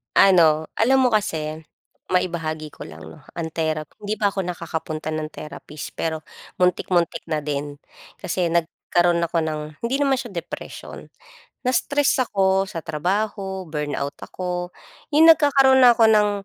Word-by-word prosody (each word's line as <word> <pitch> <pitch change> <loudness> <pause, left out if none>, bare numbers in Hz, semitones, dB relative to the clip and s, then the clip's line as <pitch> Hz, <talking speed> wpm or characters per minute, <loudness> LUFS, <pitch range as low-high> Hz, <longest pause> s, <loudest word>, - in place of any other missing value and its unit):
Ano, 160 -5 +5
alam 265 +4 +4
mo 255 - +4
kasi 160 -8 -2 0.5
maibahagi 165 -4 -1
ko - - -10
lang 80 0 -11
'no, 80 0 -13
ang 165 -1 -4
therapy, 155 -1 -2
hindi 210 0 -3
pa 210 -1 +1
ako 195 -2 -3
nakakapunta 160 -3 -4
ng 155 0 -2
therapist, 150 -1 -8
pero 160 -1 -2 0.4
muntik-muntik 175 -2 +1
na 155 -2 -2
din. 145 0 -4 0.4
Kasi 180 0 -1
nagkaroon 170 +1 +1
ako 165 0 0
ng, 155 -1 -2 0.2
hindi 235 +3 -1
naman 280 -1 +2
siya 240 - -8
depression. 175 -4 -8 0.5
Na-stress 285 +3 +1
ako 195 -1 +2
sa 165 -4 -6
trabaho, 190 +4 -2
burnout 145 -2 -3
ako, 180 -1 -5 0.4
yung 325 +2 +9
nagkakaroon 275 -3 +5
na 245 -2 +7
ako 230 - +4
ng 210 -1 +4
175 Hz, 140 wpm, -22 LUFS, 155-210 Hz, 0.5 s, yung